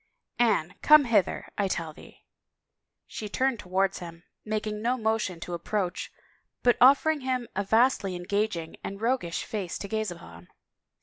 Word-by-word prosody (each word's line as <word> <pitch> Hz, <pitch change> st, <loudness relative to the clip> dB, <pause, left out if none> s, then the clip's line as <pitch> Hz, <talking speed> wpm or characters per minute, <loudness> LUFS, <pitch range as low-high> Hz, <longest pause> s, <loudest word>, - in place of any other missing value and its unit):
" -, -, -60 dB
Anne, 200 Hz, -8 st, +2 dB
come 300 Hz, -2 st, +7 dB
hither, 215 Hz, -6 st, +1 dB
I 200 Hz, -, +2 dB
tell 165 Hz, -4 st, -3 dB
thee." -, -, -16 dB, 0.8 s
She 210 Hz, -, -7 dB
turned 260 Hz, +1 st, 0 dB
towards 190 Hz, +1 st, 0 dB
him, 170 Hz, -1 st, -10 dB, 0.2 s
making 215 Hz, 0 st, -3 dB
no 245 Hz, +3 st, +1 dB
motion 220 Hz, -6 st, -1 dB
to 175 Hz, -, -6 dB
ap 170 Hz, -, -4 dB
proach, 195 Hz, -4 st, -2 dB, 0.5 s
but 245 Hz, -1 st, +5 dB
offering 285 Hz, +4 st, +5 dB
him 255 Hz, -2 st, -2 dB
a 200 Hz, -, 0 dB
vastly 220 Hz, -2 st, +2 dB
engaging 175 Hz, -2 st, -2 dB
and 195 Hz, 0 st, -6 dB
roguish 230 Hz, -7 st, -1 dB
face 200 Hz, -7 st, -4 dB
to 200 Hz, -, -6 dB
gaze 220 Hz, 0 st, -2 dB
upon. 85 Hz, -, -11 dB
210 Hz, 160 wpm, -27 LUFS, 180-240 Hz, 0.8 s, come